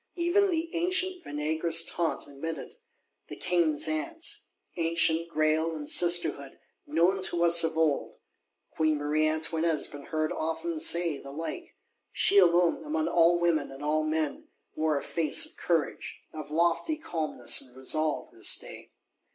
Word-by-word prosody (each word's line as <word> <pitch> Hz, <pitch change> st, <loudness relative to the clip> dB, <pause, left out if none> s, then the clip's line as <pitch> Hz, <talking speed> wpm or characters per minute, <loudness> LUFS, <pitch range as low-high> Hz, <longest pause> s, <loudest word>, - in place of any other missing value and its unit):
Even 370 Hz, +3 st, +2 dB
the 330 Hz, -1 st, -2 dB
ancient 370 Hz, +2 st, 0 dB
vinaigrous 160 Hz, +3 st, -1 dB
Tantes 170 Hz, 0 st, -2 dB
admit 150 Hz, +3 st, -6 dB
it; -, -, -9 dB, 0.5 s
the -, -, -8 dB
King's 170 Hz, -5 st, +1 dB
Aunts, 155 Hz, -, -4 dB, 0.3 s
ancient 165 Hz, 0 st, 0 dB
Graille 160 Hz, +1 st, 0 dB
and 150 Hz, -2 st, -7 dB
Sisterhood, 170 Hz, -6 st, +2 dB, 0.3 s
known 175 Hz, +6 st, +1 dB
to 175 Hz, -2 st, +2 dB
us 170 Hz, 0 st, +7 dB
of 160 Hz, 0 st, -1 dB
old. 155 Hz, -3 st, 0 dB, 0.6 s
Queen 155 Hz, -1 st, 0 dB
Marie 150 Hz, +1 st, 0 dB
Antoinette 160 Hz, +1 st, 0 dB
has 155 Hz, -3 st, 0 dB
been 145 Hz, 0 st, -11 dB
heard 155 Hz, -1 st, -2 dB
often 160 Hz, +1 st, -3 dB
say 165 Hz, -2 st, +3 dB
the 140 Hz, -, -11 dB
like. 165 Hz, -, -7 dB, 0.4 s
She 200 Hz, -, +4 dB
alone, 175 Hz, -2 st, +3 dB
among 310 Hz, +1 st, -2 dB
all 170 Hz, 0 st, +4 dB
women 170 Hz, -4 st, 0 dB
and 135 Hz, +1 st, -10 dB
all 155 Hz, +1 st, +1 dB
men, 155 Hz, -1 st, -2 dB, 0.3 s
wore 155 Hz, -1 st, 0 dB
a -, -, -4 dB
face 170 Hz, -, 0 dB
of 310 Hz, -, -13 dB
courage, 165 Hz, -4 st, -2 dB, 0.2 s
of 155 Hz, -2 st, -8 dB
lofty 170 Hz, -, 0 dB
calmness 160 Hz, -, 0 dB
and 130 Hz, -1 st, -14 dB
resolve, 155 Hz, +3 st, 0 dB
this -, -, 0 dB
day. -, -, -11 dB
165 Hz, 150 wpm, -28 LUFS, 155-175 Hz, 0.6 s, us